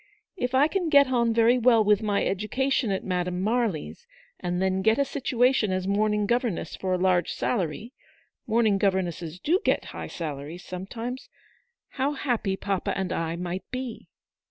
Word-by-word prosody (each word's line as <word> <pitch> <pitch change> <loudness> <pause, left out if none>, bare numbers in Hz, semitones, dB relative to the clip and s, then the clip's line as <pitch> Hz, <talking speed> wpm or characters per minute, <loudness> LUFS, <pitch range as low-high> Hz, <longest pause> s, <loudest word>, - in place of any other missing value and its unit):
If 250 -8 -2
I 280 +3 +5
can 355 -1 -1
get 280 -3 +6
on 235 -2 +2
very 230 +2 +4
well 230 -2 +5
with 210 0 +3
my 205 -2 0
education 240 +6 0
at 190 -1 -1
Madame 180 -1 -2
Marly's, 225 - -1 0.3
and 175 0 -2
then 190 0 +1
get 220 +4 +3
a 280 - +2
situation 250 -5 +1
as 185 0 -1
morning 210 +1 +1
governess 235 -7 -1
for 185 -1 -2
a - - +2
large 180 -2 +2
salary 210 - -2 0.3
— - - -41
morning 220 -3 +2
governesses 180 -4 -1
do 335 - +2
get - - +1
high - - -6
salaries 155 +1 -6
sometimes 225 +8 -6 0.3
— 485 0 -48
how 280 +2 +2
happy 235 -8 -1
papa 195 -2 -2
and 190 -1 -2
I 165 0 -2
might 180 +1 -5
be." 255 -2 -6
210 Hz, 170 wpm, -26 LUFS, 185-250 Hz, 0.3 s, get